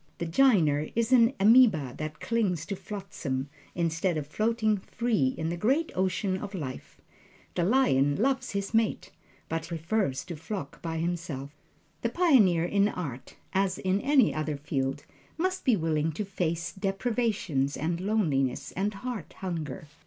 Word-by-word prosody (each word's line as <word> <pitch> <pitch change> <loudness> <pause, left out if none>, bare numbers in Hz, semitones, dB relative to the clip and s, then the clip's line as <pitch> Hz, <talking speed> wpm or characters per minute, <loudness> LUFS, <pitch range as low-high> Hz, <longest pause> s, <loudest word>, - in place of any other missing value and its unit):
The 170 - -3
"jiner" 165 - +3
is 230 +2 +1
an 240 0 +6
ameba 205 - +5
that 155 0 -5
clings 195 -9 0
to 195 +2 -3
flotsam, 180 -9 -5 0.3
instead 170 0 0
of 150 - -3
floating 215 +5 +1
free 190 - 0
in 160 0 -2
the 170 - -2
great 270 - +1
ocean 185 +1 0
of 200 +1 -6
life. 135 -7 -7 0.5
The 175 - 0
lion 155 - +3
loves 260 - 0
his 200 +2 -3
mate, 225 -1 +1 0.4
but 165 0 -3
prefers 165 -3 -1
to 175 -2 -6
flock 160 -2 -6
by 165 -1 -3
himself. 165 -5 -3 0.5
The 235 - 0
pioneer 230 - +4
in 200 +3 +3
art, 140 - -6 0.2
as 190 -1 +1
in 190 +2 0
any 275 -4 +4
other 155 -1 -2
field, 140 -1 -2 0.3
must 370 +3 -1
be 250 - +5
willing 160 -3 0
to 210 +7 -3
face 170 -3 -2
deprivations 195 - -1
and 170 +3 -2
loneliness 160 - 0
and 200 +2 -2
heart 245 +1 -6
hunger. 160 -6 -5
185 Hz, 150 wpm, -28 LUFS, 155-220 Hz, 0.5 s, an